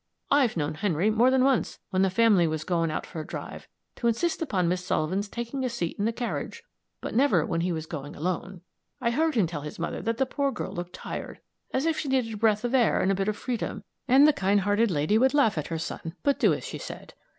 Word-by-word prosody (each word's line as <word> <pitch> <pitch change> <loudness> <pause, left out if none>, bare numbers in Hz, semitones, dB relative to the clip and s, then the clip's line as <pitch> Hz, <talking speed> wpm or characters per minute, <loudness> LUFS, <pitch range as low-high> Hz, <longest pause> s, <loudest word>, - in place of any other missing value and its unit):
I've 265 -9 +3
known 150 -1 -1
Henry 180 +3 +1
more 230 +4 +4
than 260 0 +3
once, 265 -3 +1
when 185 -1 +2
the 195 - +4
family 195 -3 +4
was 155 -1 -2
going 165 -1 0
out 155 - -3
for 165 - -7
a 155 - -9
drive, - - -7 0.3
to 235 - 0
insist 315 +11 0
upon 190 - 0
Miss 180 +1 0
Sullivan's 185 +4 -1
taking 240 +4 -4
a 255 - 0
seat 175 -9 -3
in 205 - +1
the 225 - +2
carriage 240 +1 -4 0.4
but - - -5
never 225 - +3
when 165 - -1
he 180 +1 0
was 160 -2 -3
going 145 -3 -7
alone. 180 +2 -3 0.4
I 235 -3 +1
heard 315 +4 +1
him 215 -6 +4
tell 165 -3 -5
his 150 +1 -7
mother 170 - -3
that 230 0 -1
the 265 - +2
poor 280 +1 -1
girl - - -5
looked 175 0 -6
tired, - - -6 0.3
as 265 +3 0
if 325 -1 +1
she 295 - -3
needed 255 -4 +1
a - - -5
breath 215 0 +2
of 240 +1 -1
air 250 -4 +4
and 190 - +2
a - - +2
bit 195 +1 -1
of 215 0 -1
freedom, 230 -4 -3 0.2
and 275 +3 +7
the 305 - +5
kind 195 -1 +2
hearted 205 +4 +2
lady 170 +6 +2
would 265 +3 +3
laugh 275 -8 +4
at 155 - -3
her 165 - -3
son, 165 +1 -5
but 280 -1 +2
do - - +4
as - - -3
he - - -6
said. - - -9
205 Hz, 250 wpm, -27 LUFS, 170-250 Hz, 0.4 s, and